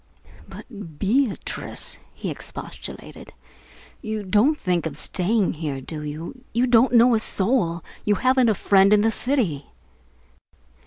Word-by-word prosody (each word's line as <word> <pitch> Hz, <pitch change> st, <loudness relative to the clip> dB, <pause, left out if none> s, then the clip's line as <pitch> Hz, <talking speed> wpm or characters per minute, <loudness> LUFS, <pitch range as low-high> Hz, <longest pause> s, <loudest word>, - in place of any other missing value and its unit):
"But 200 Hz, -, -10 dB
Beatrice," 230 Hz, -, -1 dB, 0.2 s
he -, -, -4 dB
expostulated, -, -, -9 dB, 0.7 s
"you 215 Hz, -1 st, -4 dB
don't 215 Hz, +11 st, +3 dB
think 175 Hz, -, -1 dB
of 150 Hz, -2 st, -7 dB
staying 195 Hz, +5 st, 0 dB
out -, -, -3 dB
here, 150 Hz, -4 st, -3 dB
do 150 Hz, +4 st, -6 dB
you? 155 Hz, -, -7 dB
You 240 Hz, +2 st, +3 dB
don't 245 Hz, 0 st, +4 dB
know 240 Hz, +1 st, +6 dB
a 225 Hz, -, +3 dB
soul. 190 Hz, -6 st, 0 dB, 0.2 s
You 210 Hz, -, +2 dB
haven't 255 Hz, +2 st, +3 dB
a 215 Hz, -, +2 dB
friend 195 Hz, +1 st, +4 dB
in 210 Hz, -, +5 dB
the 225 Hz, +1 st, +2 dB
city." 215 Hz, -, -1 dB
205 Hz, 140 wpm, -23 LUFS, 170-240 Hz, 0.7 s, know